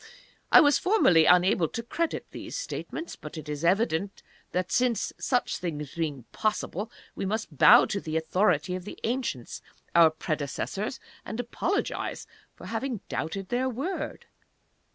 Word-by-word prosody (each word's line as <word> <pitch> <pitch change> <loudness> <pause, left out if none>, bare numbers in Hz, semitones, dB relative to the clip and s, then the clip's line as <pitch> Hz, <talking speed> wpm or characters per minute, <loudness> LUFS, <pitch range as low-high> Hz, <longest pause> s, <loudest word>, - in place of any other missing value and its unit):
I - - +10
was 290 -2 +4
formerly 365 - +5
unable 180 -1 +5
to 230 - -5
credit 335 +8 -2
these - - -6
statements. 425 -8 -5
But 150 +1 -9
it 155 -1 -7
is 150 +1 -4
evident 195 +1 +1 0.3
that, 180 -1 -1
such 250 +1 0
things 150 -5 -5
being 150 -6 -3
possible, 215 -1 -2 0.2
we - - -5
must 205 -4 -3
bow - - +8
to 200 - -3
the 160 0 -2
authority 160 0 +1
of 185 0 -4
the 205 - -8
Ancients, 230 - -3 0.3
our 170 -1 +7
predecessors, 155 - -3 0.2
and 220 - -6
apologize 325 - -2 0.3
for - - -12
having 255 -7 -3
doubted 165 +8 -3
their 255 +2 0
word." 275 +10 -4
190 Hz, 140 wpm, -27 LUFS, 160-240 Hz, 0.3 s, I